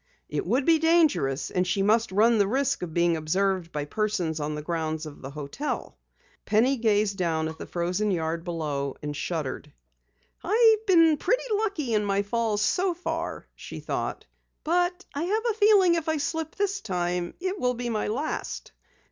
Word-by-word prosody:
It 400 - -3
would 260 +3 +1
be 325 -1 +5
dangerous 305 - +2
and 180 0 0
she 195 +2 +1
must 220 +1 +2
run 220 +3 +4
the 200 - +3
risk 270 +5 0
of 175 -3 -4
being 170 +1 +2
observed 180 +2 0
by 150 -1 -3
persons 180 -4 -1
on 150 0 -2
the 150 - -5
grounds 160 -1 -2
of 150 -2 -10
the 135 - -7
hotel. 150 - -5 0.5
Penny 245 +6 +2
gazed 210 -3 +1
down 160 -3 0
at 160 0 -8
the - - -7
frozen 180 +4 -1
yard 165 -3 -1
far - - -16
below 150 -5 -3
and 150 0 -4
shuddered. 155 -3 -4 0.7
"I've 445 +2 +4
been 330 -5 +5
pretty 485 - 0
lucky 395 - -1
in 210 -1 +2
my 200 0 +1
falls 215 0 0
so 365 -1 +1
far," 355 - -4
she - - -9
thought. - - -4 0.4
"But 355 +3 0
I 285 - -3
have 430 +5 0
a 435 - -8
feeling 405 -4 +6
if 330 -2 -1
I 315 - +1
slip 320 +2 -3
this 400 -1 -1
time 180 -3 -2
it 375 +2 -3
will 250 0 +1
be 240 0 -3
my 215 -2 -1
last." 260 +9 -4
215 Hz, 180 wpm, -26 LUFS, -, 0.7 s, feeling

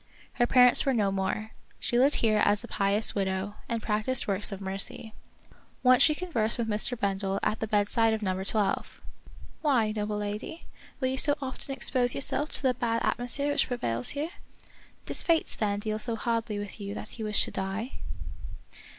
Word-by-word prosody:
Her 240 - +2
parents 250 -1 +7
were 270 -3 +1
no 205 -3 +2
more. 195 +3 -2 0.3
She 240 - 0
lived 275 +3 +4
here 215 -2 +2
as 205 0 +2
a - - -7
pious 200 +2 +1
widow, 190 0 -2 0.2
and 230 -2 -2
practiced 215 +4 +2
works 200 +1 -1
of 195 - -5
mercy. 195 +3 -4 0.7
Once 255 -1 +6
she 305 - +6
conversed 290 -12 -1
with 235 -2 -1
Mr. 220 +3 0
Bendel 195 -1 -1
at 215 - 0
the 220 - -2
bedside 215 +2 +2
of 220 -1 -2
Number 190 -1 -1
Twelve, 205 0 0 0.3
" - - -20
Why, 250 -8 +2
noble 210 0 -2
lady, 210 +10 -5 0.4
will 260 -2 0
you 265 0 -1
so 290 -2 +5
often 270 0 -4
expose 245 -1 +1
yourself 290 +2 0
to - - +1
the 260 -1 +3
bad 230 -1 -1
at - - 0
mosphere 280 +4 -2
which - - +1
prevails 120 - -2
here 310 +4 -2 0.4
} - - -28
Does - - 0
fate, 330 -2 +1
then, 205 -2 0
deal 215 0 -2
so 230 +1 0
hardly 230 -1 -2
with 205 +1 -7
you 200 +1 -5
that 215 - -6
you 220 - -3
wish 210 -1 +3
to - - -7
die 195 +6 -4
220 Hz, 195 wpm, -28 LUFS, 205-250 Hz, 0.7 s, parents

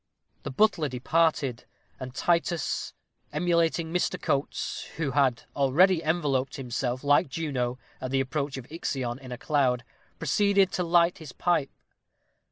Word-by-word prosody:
The - - -5
butler 160 -1 +2
departed, 130 -1 +1 0.3
and 130 0 -7
Titus, 170 0 0 0.4
emulating 165 +1 +1
Mr. 180 - 0
Coates, 140 0 -2
who 155 -4 -1
had 130 -3 +2
already 160 +6 +4
enveloped 145 -5 0
himself, 125 0 -3
like 145 0 +4
Juno 130 -5 -2 0.2
at 130 - -3
the 135 +1 +1
approach 140 +1 -2
of 130 - -7
Ixion, 130 -6 -3
in 130 -2 -11
a 125 - -4
cloud, 130 -5 +1 0.3
proceeded 195 +4 +3
to 180 - -1
light 170 0 +3
his 155 -5 -10
pipe. 165 -6 +1
145 Hz, 135 wpm, -27 LUFS, 130-170 Hz, 0.4 s, already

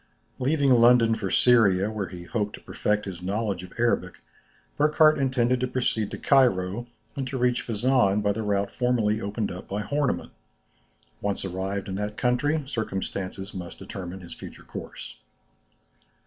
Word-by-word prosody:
Leaving 140 +1 +2
London 120 -1 +6
for 110 -4 -2
Syria, 105 -5 +4
where 105 -3 -3
he 90 0 -9
hoped 105 +3 -2
to - - -13
perfect 105 0 -1
his 90 -3 -7
knowledge 100 0 -2
of 90 - -11
Arabic, 115 -6 +1 0.6
Burckhardt 155 +1 +4
intended 125 -2 +2
to 125 - 0
proceed 120 -4 -1
to - - -6
Cairo 120 -5 +2 0.3
and 135 -2 -3
to 130 - -3
reach 125 -1 +2
Fezzan 110 -3 +2
by 105 - +2
the 110 +2 -3
route 100 -1 0
formerly 115 -4 +1
opened 105 +1 -2
up 90 - -8
by 105 +2 -3
Hornemann. 140 +5 -1 0.9
Once 100 -1 -2
arrived 95 +2 -3
in 95 - -4
that 105 +1 -4
country, 145 +5 +1
circumstances 100 -5 -4
must 90 -3 -7
determine 95 0 -7
his 85 -2 -10
future - - -11
course. - - -9
105 Hz, 155 wpm, -26 LUFS, 95-125 Hz, 0.9 s, London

